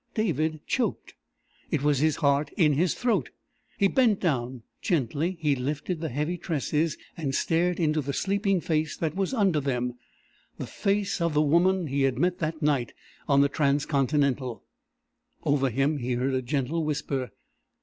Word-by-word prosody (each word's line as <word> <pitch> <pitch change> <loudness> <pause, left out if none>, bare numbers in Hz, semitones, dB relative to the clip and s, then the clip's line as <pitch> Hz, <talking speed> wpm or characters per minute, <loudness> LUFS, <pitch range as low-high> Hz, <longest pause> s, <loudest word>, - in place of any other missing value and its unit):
David 160 - -1
choked. 255 - -2 0.6
It 155 -5 -1
was 145 -2 +3
his 155 0 +2
heart 140 -1 +2
in 155 -5 +4
his 165 +4 +1
throat. 220 - 0 0.5
He 200 -3 +4
bent 225 -2 +3
down. 125 -7 -1 0.2
Gently 165 - 0
he 150 -3 +2
lifted 145 +6 -3
the 160 - -2
heavy 150 +7 -2
tresses, 160 -1 -1 0.2
and 140 -6 -2
stared 175 +2 +1
into 155 -2 +1
the 140 0 -3
sleeping 195 +3 0
face 155 -2 -1
that 160 -2 -2
was 195 -1 -1
under 200 - +2
them 125 -3 -1 0.6
the - - -4
face 200 -2 -1
of 170 -2 0
the 150 - +4
woman 175 +4 +3
he 140 -1 -1
had 135 -2 +2
met 180 0 +1
that 155 -1 -3
night 140 -5 +1 0.4
on 140 -1 +5
the 140 - +5
Transcontinental! 140 -3 0 0.8
Over 135 -2 +2
him 135 +5 0
he 125 0 -2
heard 130 +2 0
a 130 - +1
gentle 140 +5 -1
whisper. 140 -4 -2
150 Hz, 160 wpm, -27 LUFS, 140-170 Hz, 0.8 s, on